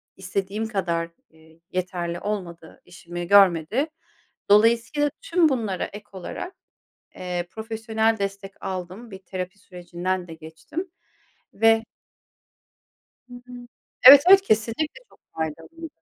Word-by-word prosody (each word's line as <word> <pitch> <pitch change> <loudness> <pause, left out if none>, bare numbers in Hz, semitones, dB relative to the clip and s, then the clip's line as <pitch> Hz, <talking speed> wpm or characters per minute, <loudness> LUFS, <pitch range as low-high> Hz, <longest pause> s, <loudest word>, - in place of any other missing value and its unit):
istediğim 195 +3 -3
kadar, 170 -6 -2 0.2
eee, 160 0 -22
yeterli, 175 -2 -3
olmadı 175 -6 -6
işimi 175 0 -8
görmedi. 200 - +4 0.6
Dolayısıyla 230 +7 +3
tüm 335 -2 +3
bunlara 220 -9 -2
ek 205 +1 -10
olarak, 195 - -7 0.6
eee, 180 -1 -4
profesyonel 220 0 -1
destek 195 0 -4
aldım 185 +5 -6
bir 190 - -9
terapi 185 +1 -7
sürecinden 180 0 -5
de 165 - -8
geçtim. 160 - -8 0.6
Ve 225 +1 +4 1.5
Hı 245 - -12
hı. 245 0 -13 0.6
Evet, 275 +1 +12
evet, 390 +1 +9
kesinlikle 230 - -1
çok - - -25 0.2
faydalıydı. 165 - -6
195 Hz, 110 wpm, -24 LUFS, 175-225 Hz, 1.5 s, Evet